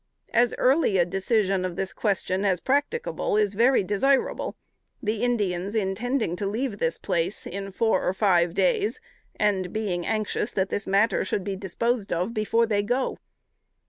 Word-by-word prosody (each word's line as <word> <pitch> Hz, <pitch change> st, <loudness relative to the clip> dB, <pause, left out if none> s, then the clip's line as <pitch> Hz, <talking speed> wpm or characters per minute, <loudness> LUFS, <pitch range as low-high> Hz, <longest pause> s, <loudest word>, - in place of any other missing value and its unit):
As 240 Hz, +1 st, +3 dB
early 260 Hz, -6 st, +3 dB
a 175 Hz, -, +4 dB
decision 195 Hz, +1 st, +1 dB
of 180 Hz, -2 st, -3 dB
this 190 Hz, +1 st, -3 dB
question 195 Hz, -2 st, -1 dB
as 190 Hz, -3 st, +2 dB
practicable, 285 Hz, -, 0 dB
is 210 Hz, -2 st, +2 dB
very 235 Hz, +2 st, +4 dB
desirable: 255 Hz, +8 st, +1 dB, 0.4 s
the 215 Hz, -3 st, -2 dB
Indians 205 Hz, -5 st, 0 dB
intending 220 Hz, 0 st, -1 dB
to 200 Hz, -, -2 dB
leave 220 Hz, 0 st, -2 dB
this 165 Hz, 0 st, 0 dB
place 180 Hz, 0 st, -2 dB
in 195 Hz, +1 st, -5 dB
four 225 Hz, +3 st, +1 dB
or -, -, +1 dB
five 175 Hz, -4 st, +2 dB
days, 445 Hz, -3 st, +1 dB, 0.4 s
and 190 Hz, -4 st, 0 dB
being 195 Hz, -5 st, -2 dB
anxious 215 Hz, +2 st, -1 dB
that 190 Hz, -1 st, 0 dB
this 205 Hz, -, -3 dB
matter 200 Hz, +4 st, +2 dB
should 190 Hz, 0 st, -2 dB
be 195 Hz, 0 st, -3 dB
disposed 205 Hz, +4 st, -2 dB
of 180 Hz, +7 st, -1 dB
before 230 Hz, +1 st, +2 dB
they 210 Hz, -3 st, +1 dB
go. 245 Hz, +5 st, -1 dB
205 Hz, 160 wpm, -25 LUFS, 190-235 Hz, 0.4 s, a